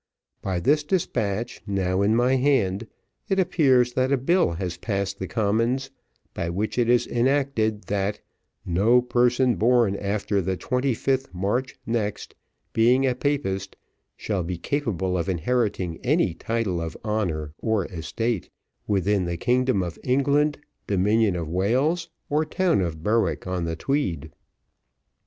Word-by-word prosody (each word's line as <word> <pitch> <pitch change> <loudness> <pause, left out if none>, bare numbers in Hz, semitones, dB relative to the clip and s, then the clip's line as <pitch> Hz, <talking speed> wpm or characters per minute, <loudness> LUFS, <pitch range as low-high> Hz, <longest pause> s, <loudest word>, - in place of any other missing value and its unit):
By 95 -2 -1
this 145 - +3
despatch, 120 - -2
now 95 -1 0
in 105 +2 +3
my 125 +2 +3
hand, 115 -6 +1 0.4
it 195 - +1
appears 130 -9 +3
that 130 +2 +1
a 140 - +4
Bill 155 - +2
has 90 0 -3
passed 100 -2 -2
the 95 - -3
Commons, 115 +7 0 0.4
by 85 - -3
which 105 +7 -2
it 120 -1 +2
is 120 0 +4
enacted, 120 -4 +1
'that 105 +1 -1 0.5
no 110 +8 +3
person 125 0 +2
born 115 -3 +3
after 100 0 -1
the 95 +1 -2
25th 130 +2 0
March 115 +9 -1
next, 110 -3 -2 0.4
being 125 +4 +4
a 130 - +2
Papist, 120 -8 -2 0.4
shall 100 -4 -2
be 90 +1 -3
capable 95 - -1
of 85 - -2
inheriting 95 -2 -1
any 85 - +2
title 105 -3 -2
of 80 0 -5
honour 85 -9 -2
or 110 -4 0
estate, 95 +5 -3 0.4
within 100 -1 +1
the 85 0 -3
kingdom 125 -1 +1
of 85 -2 -6
England, 140 +3 +2 0.3
dominion 105 +1 +2
of 85 -3 -3
Wales, 125 - +1 0.2
or 150 +2 +1
town 170 - +1
of 80 -3 -3
Berwick 105 -7 +1
on 90 -2 -2
the 80 0 -2
Tweed.'" 85 - -2
110 Hz, 140 wpm, -24 LUFS, 95-130 Hz, 0.5 s, a